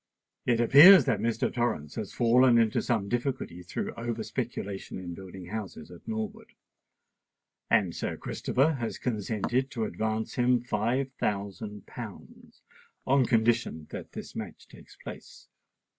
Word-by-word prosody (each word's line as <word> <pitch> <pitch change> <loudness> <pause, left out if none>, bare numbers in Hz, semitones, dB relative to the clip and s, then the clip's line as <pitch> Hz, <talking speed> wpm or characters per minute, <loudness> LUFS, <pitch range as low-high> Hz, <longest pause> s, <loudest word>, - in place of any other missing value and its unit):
It 120 -2 +3
appears 150 +11 +9
that 105 - +1
Mr. 115 +1 0
Torrens 120 - -1
has 110 -3 -5
fallen 120 +1 +4
into 115 -2 +3
some 110 -5 0
difficulty 120 -6 -3
through 90 - -4
over 115 -1 -4
speculation 110 -6 -5
in 90 -2 -6
building 95 0 -9
houses 100 -7 -6
at 90 - -14
Norwood; 110 -1 -5 1.2
and - - +2
Sir - - -3
Christopher 145 +5 0
has 115 -2 -3
consented 120 +3 -1
to 120 -5 -3
advance 110 +3 -2
him 125 0 +3
five 120 +3 -1
thousand 100 +1 -3
pounds, - - -11 0.4
on 130 -2 +3
condition 115 -8 +1
that - - -8
this - - -8
match - - -7
takes - - -16
place. - - -11
115 Hz, 135 wpm, -28 LUFS, 100-120 Hz, 1.2 s, appears